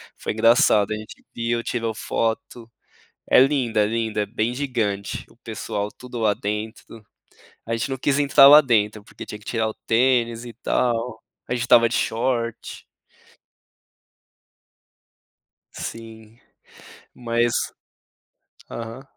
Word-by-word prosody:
Foi - - -4
engraçado, 110 -2 +4
a - - -2
gente 110 0 -11
viu, 115 0 -1
tirou 115 -2 -3
foto. 115 +1 -3 0.6
É - - +7
linda, 130 -5 +2
é 105 - +3
linda, 110 -1 -1
é - - -5
bem 110 +3 -2
gigante. 115 - -3
O - - -23
pessoal 105 0 -4
tudo 125 +2 -9
lá 110 -2 +2
dentro. 110 +2 -6 0.7
A 115 - -1
gente 115 - -2
não 135 - -2
quis 140 +2 0
entrar 140 -1 +6
lá 150 +2 +10
dentro, 110 -5 +1
porque - - -11
tinha 105 - -8
que 105 - -20
tirar 115 -2 -1
o 110 - -6
tênis 120 -1 +2
e 120 - -9
tal. 115 -1 -1 0.3
A - - -1
gente 120 - -2
estava 120 -1 +5
de 115 - -4
short. 115 0 -2 2.9
Sim. 115 0 -9 0.8
Mas 120 0 0 1.2
aham. 115 +3 -7
115 Hz, 130 wpm, -23 LUFS, 110-125 Hz, 2.9 s, lá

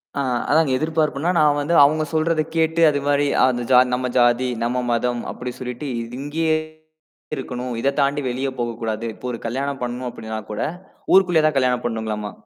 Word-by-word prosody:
ஆ, - - 0 0.3
அதாங்க 155 -2 +3
எதிர்பார்ப்புனா, 155 0 0
நான் 150 -1 +4
வந்து 150 +4 -1
அவங்க 155 +2 +3
சொல்றத 160 0 +1
கேட்டு, 160 +1 +1
அது 145 -1 0
மாரி 145 0 +2 0.2
அந்த 125 -2 0
ஜா 125 - +8
நம்ம 125 0 -1
ஜாதி, 120 +1 +3
நம்ம 125 +2 0
மதம் 120 0 0
அப்படி 125 0 -6
சொல்லிட்டு 125 +3 -5
இது 115 +2 -7
இங்கேயே 155 +2 0 0.8
இருக்கணும். 125 -2 -5
இத 140 +2 +1
தாண்டி 140 +1 +1
வெளிய 130 +2 -2
போகக்கூடாது. 115 -1 -3
இப்போ - - -12
ஒரு 115 - -5
கல்யாணம் 135 +3 -3
பண்ணணும் 125 +1 -3
அப்படின்னா 110 -1 -6
கூட, 105 - -4 0.5
ஊருக்குள்ளயே 180 -5 +5
தான் 150 -3 0
கல்யாணம் 125 -2 +1
பண்ணணுங்களம்மா. 110 -2 -3
130 Hz, 170 wpm, -21 LUFS, 120-150 Hz, 0.8 s, ஜா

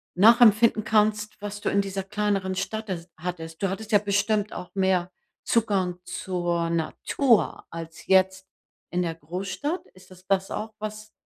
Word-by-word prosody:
nachempfinden 220 +2 +6
kannst, 215 0 +1
was 205 0 -6
du - - 0
in 200 - +3
dieser 195 0 -4
kleineren 195 -1 -1
Stadt, 215 +3 -3
äh, 170 -3 -4
hattest. 165 -1 -6
Du 195 - +1
hattest 210 +4 -5
ja 205 - +6
bestimmt 205 +1 0
auch 180 - -7
mehr 185 -2 +1 0.3
Zugang 195 -6 +1
zur 175 -2 -2
Natur 210 - +1
als 165 0 -9
jetzt 190 0 +3 0.4
in 180 - 0
der 165 -2 -2
Großstadt. 190 - -4
Ist 185 0 -18
das 185 0 -15
das 195 0 +1
auch 220 +1 -4
was 215 0 -6
195 Hz, 155 wpm, -26 LUFS, 180-210 Hz, 0.4 s, nachempfinden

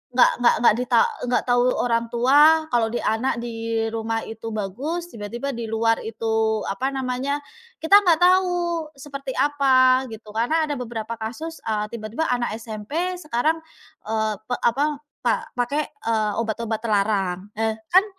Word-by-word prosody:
nggak 255 - +6
nggak 245 - +5
nggak 235 - +7
di 250 - -1
ta - - +5 0.3
nggak 245 - +1
tahu 245 0 +4
orang 230 -1 0
tua 295 +6 +5
kalau 235 -2 +2
di 240 - -2
anak 230 +4 0
di 225 -1 -2
rumah 225 0 -2
itu 225 0 -8
bagus, 275 - -4
tiba-tiba 235 +6 -5
di 235 -3 -5
luar 225 +1 +1
itu 220 -1 -1
apa 250 +7 -1
namanya 265 +2 -2 0.4
kita 395 +6 +8
nggak 340 -4 +4
tahu 355 -3 +2
seperti 275 -1 -7
apa 260 -2 +4
gitu. 215 -1 -10
Karena 240 +9 +1
ada 295 - -2
beberapa 230 -2 -5
kasus, 310 +10 -6
eee, 210 -1 0
tiba-tiba 230 +7 -3
anak 245 -3 -1
SMP 245 - -4
sekarang, 305 +1 0 0.5
eee, 220 -1 0
pe 245 - -1
apa 265 +5 +2 0.4
pak 235 - +2 0.2
pakai, 280 +5 0 0.2
eee, 215 -2 +1
obat-obat 225 -1 -2
terlarang. 200 -3 0
Eee, 220 0 0 0.2
kan 375 +3 +6
240 Hz, 155 wpm, -23 LUFS, 220-285 Hz, 0.5 s, kita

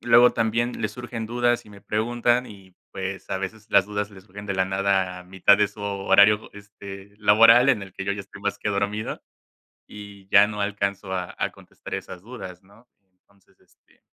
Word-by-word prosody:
luego 120 +1 +6
también 115 +2 -1
les - - -2
surgen 120 -2 -6
dudas 120 +1 0
y 105 - -15
me 100 -1 -14
preguntan 120 +3 0
y 95 -3 -15 0.2
pues 95 0 -5
a - - -2
veces 105 +3 -6
las 100 -1 +4
dudas 105 0 -3
le 95 - -13
surgen 105 +2 -11
de 100 - -2
la 95 0 +2
nada 95 -1 0
a 90 - -12
mitad 95 +2 +4
de 105 - +4
su 105 - -14
horario, 100 +1 +3
este, 100 -1 -11
laboral 115 +5 +6
en 105 - 0
el 95 -2 -10
que 95 - -6
yo 100 - 0
ya 100 - -5
estoy 100 - -13
más 105 0 -2
que 105 - -3
dormido 100 +2 -2 0.7
y 100 -2 -12
ya 100 +1 +7
no 105 -1 -4
alcanzo 100 -1 -3
a 90 -1 -4
a - - -1
contestar - - -10
esas 90 - -9
dudas, 95 -6 -10
¿no? 105 +5 -22 0.3
Entonces, 100 +1 -32
este - - -31
100 Hz, 200 wpm, -24 LUFS, 95-110 Hz, 0.7 s, ya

